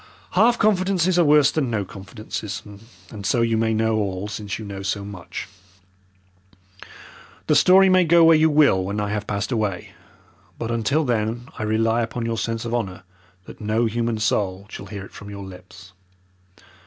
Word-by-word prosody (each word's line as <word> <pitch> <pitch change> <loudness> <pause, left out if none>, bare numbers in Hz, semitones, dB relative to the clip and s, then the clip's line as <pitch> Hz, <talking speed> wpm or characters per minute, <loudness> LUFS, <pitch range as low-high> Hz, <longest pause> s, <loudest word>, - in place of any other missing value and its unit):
Half 240 +1 +4
confidences 185 -4 +2
are - - +6
worse 150 -2 +5
than 145 -5 -1
no 105 -4 -1
confidences, 100 +2 -7 0.5
and 105 -2 -8
so 120 +4 +1
you 115 -1 +1
may 110 0 +1
know 110 0 +1
all 100 -1 -2
since 105 -2 -5
you 110 - -8
know 100 -1 -7
so 100 +1 -3
much. 95 -4 -8 2.0
The - - +2
story 190 +1 +6
may 185 -1 +5
go 170 0 +5
where 165 0 +7
you 160 +1 +4
will 145 -11 +4
when 100 +3 -3
I 105 0 -2
have 105 0 -3
passed 100 +4 -3
away, 105 -6 -2 0.7
but 115 0 -4
until 125 +7 +1
then 120 +1 -2
I - - -4
rely 110 +2 +1
upon 115 +1 -3
your 115 -1 -2
sense 115 0 -3
of 115 - -4
honour 95 -7 -3 0.4
that - - -12
no 110 +2 +1
human 115 0 -1
soul 100 -2 -1
shall 100 - -8
hear 100 -1 -7
it - - -15
from 100 - -11
your 100 -1 -8
lips. 95 0 -13
110 Hz, 180 wpm, -22 LUFS, 100-125 Hz, 2.0 s, where